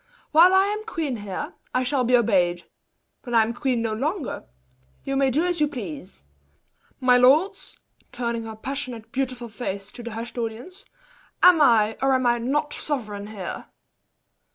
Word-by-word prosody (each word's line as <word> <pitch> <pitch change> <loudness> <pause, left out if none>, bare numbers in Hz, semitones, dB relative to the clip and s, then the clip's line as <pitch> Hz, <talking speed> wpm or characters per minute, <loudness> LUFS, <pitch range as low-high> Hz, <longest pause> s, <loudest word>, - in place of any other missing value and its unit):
"While 335 +4 +7
I 380 0 +5
am 420 +1 -2
queen 320 - -3
here, 205 -3 -5 0.2
I 255 - +2
shall 255 0 +1
be 245 +1 +4
obeyed; 180 -7 +1 0.6
when 240 -2 -4
I 225 - +6
am 225 +2 -3
queen 245 -1 -1
no 225 -1 -1
longer, 290 - -3 0.6
you 275 - -3
may 270 0 +3
do 300 +7 +1
as 350 -3 -1
you 300 - +4
please! 190 - -8 0.8
My 250 -1 +5
lords" 280 +10 +3 0.3
(turning 235 -2 -3
her 220 -1 -7
passionate, 250 -1 -6
beautiful 255 -2 -3
face 205 -3 -6
to - - -10
the 235 -1 -7
hushed 230 +2 -6
audience), 240 - -6 0.6
"am 355 -3 +7
I 225 -5 +4
or 270 0 +3
am 255 -1 0
I 240 0 +3
not 290 +5 -1
sovereign 210 -8 -4
here!" 210 -3 -7
245 Hz, 165 wpm, -24 LUFS, 225-285 Hz, 0.8 s, While